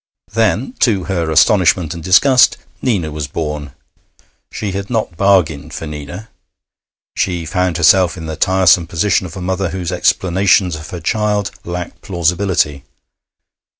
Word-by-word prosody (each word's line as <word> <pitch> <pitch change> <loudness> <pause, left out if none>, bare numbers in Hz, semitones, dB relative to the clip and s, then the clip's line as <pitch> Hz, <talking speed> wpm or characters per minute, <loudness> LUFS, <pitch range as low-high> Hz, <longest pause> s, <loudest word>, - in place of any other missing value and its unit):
Then, 250 - 0
to 100 -7 +2
her 85 -3 -2
astonishment 85 -1 +3
and 85 - -9
disgust, 125 - +4 0.2
Nina 95 - -1
was 75 -2 -4
born. 75 -2 -5 0.8
She 105 -2 -4
had 100 +1 -5
not 110 -7 -2
bargained 90 -6 +1
for - - -6
Nina. 75 +8 -8 0.9
She 90 -3 -1
found 90 0 -1
herself 90 +1 +4
in 80 - -7
the 80 0 -5
tiresome 90 -1 +3
position 90 +2 0
of 90 - -10
a - - -6
mother 95 0 -2
whose 90 0 -4
explanations 90 0 +2
of 75 +1 -9
her 90 -2 -7
child 105 +2 -1
lack 90 0 -6
plausibility. 85 -5 0
90 Hz, 140 wpm, -16 LUFS, 80-95 Hz, 0.9 s, disgust